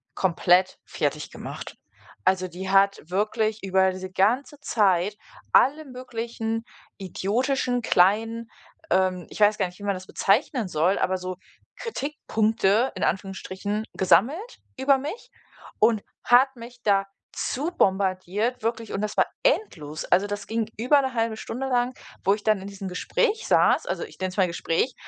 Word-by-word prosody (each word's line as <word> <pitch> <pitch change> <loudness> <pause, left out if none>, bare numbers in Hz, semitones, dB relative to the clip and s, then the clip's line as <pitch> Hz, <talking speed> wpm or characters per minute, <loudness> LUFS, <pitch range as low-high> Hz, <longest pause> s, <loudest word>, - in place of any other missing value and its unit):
komplett 180 0 +2
fertiggemacht. - - -4 0.5
Also, 185 0 +2
die 185 +2 -7
hat 195 0 +4
wirklich 215 +2 0
über 190 0 +3
diese 185 0 -7
ganze 250 +10 +1
Zeit 200 -5 +2 0.4
alle 305 +3 +4
möglichen 235 -3 -4 0.3
idiotischen, 245 +7 -1
kleinen, 225 +4 +2 0.4
ähm, 185 -1 +1
ich - - -10
weiß 210 0 +5
gar - - +2
nicht, 180 0 -14
wie - - -10
man 200 -1 +1
das 185 +1 -9
bezeichnen 215 +3 +1
soll, 175 +3 +1
aber 185 0 +1
so 185 0 -5 0.4
Kritikpunkte 230 - 0
in - - -3
Anführungsstrichen 195 +3 -2
gesammelt 285 - +2 0.2
über 270 +1 +4
mich 300 - -6 0.5
und 220 -1 +3 0.2
hat 260 +2 +5
mich 240 +1 -11
da 195 -1 +3 0.3
zubombardiert 200 - 0
wirklich 230 0 -2
und 195 - -2
das 210 0 -3
war - - +5 0.2
endlos. 165 - 0
Also, 195 +3 +3
das 205 -1 -5
ging 225 0 -1
über 255 +6 +4
'ne 265 -2 -3
1/2 225 -2 -1
Stunde 255 +4 -4
lang, 250 -1 +1 0.3
wo 195 - +4
ich 205 0 -5
dann 215 -3 +2
in 195 - -7
diesem 195 -1 -7
Gespräch 435 - 0
saß. - - +4
Also, - - -2
ich 440 - -11
nenne 185 0 -1
es 185 - -11
mal 190 -2 +4
Gespräch 170 +8 -1
210 Hz, 150 wpm, -25 LUFS, 190-245 Hz, 0.5 s, weiß